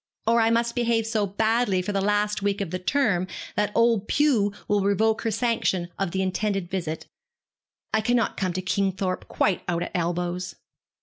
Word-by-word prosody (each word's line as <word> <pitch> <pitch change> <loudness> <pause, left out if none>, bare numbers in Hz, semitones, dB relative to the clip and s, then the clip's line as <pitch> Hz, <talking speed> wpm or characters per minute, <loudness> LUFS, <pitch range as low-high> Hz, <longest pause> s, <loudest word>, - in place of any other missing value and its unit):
Or 230 +1 +4
I 225 - +4
must 235 +1 +1
behave 235 -2 +1
so 220 -2 0
badly 220 0 +1
for 205 - -2
the 200 -1 0
last 210 +1 +1
week 200 0 0
of 195 -5 -3
the 185 - -2
term 185 -2 +1 0.3
that 210 0 +1
old 230 -3 +3
Pew 255 -9 +3 0.2
will 205 -1 +2
revoke 215 +3 +2
her 230 - 0
sanction 220 -6 0
of 195 -2 0
the 190 +2 -1
intended 195 -1 -1
visit. 165 -4 -3 0.9
I 220 - +3
cannot 240 +1 +1
come 185 -2 -1
to 185 +1 -3
Kingthorpe 190 -1 -1
quite 190 - +1
out 175 0 0
at - - -6
elbows.' 175 0 -2
200 Hz, 180 wpm, -25 LUFS, 185-225 Hz, 0.9 s, Or